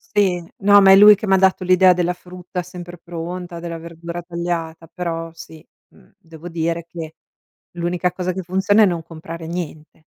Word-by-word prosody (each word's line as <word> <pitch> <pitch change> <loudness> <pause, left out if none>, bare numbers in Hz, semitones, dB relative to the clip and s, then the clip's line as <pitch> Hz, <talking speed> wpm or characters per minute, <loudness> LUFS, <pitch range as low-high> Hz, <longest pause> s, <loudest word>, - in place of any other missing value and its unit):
Sì. 190 -4 +2 0.2
No 205 0 +7
ma 195 - +6
è - - +9
lui 210 +2 +9
che 210 +1 -4
m'ha 190 0 +4
dato 190 0 +2
l'idea 185 0 +5
della 180 0 0
frutta 180 0 -7
sempre 175 0 -10
pronta, 175 +1 -7
della 170 0 -6
verdura 170 +1 -8
tagliata, 170 -1 -4
però 165 -2 -4
sì, 165 -1 -13 0.3
mhmm, - - -24
devo 165 -3 -12
dire 170 0 -2
che, 160 -2 -8 0.6
l'unica 175 +1 -1
cosa 180 0 -3
che 190 - -4
funziona 190 +4 +2
è - - +7
non 170 -3 -2
comprare 165 +1 -9
niente. 160 -2 -7
175 Hz, 175 wpm, -20 LUFS, 165-185 Hz, 0.6 s, è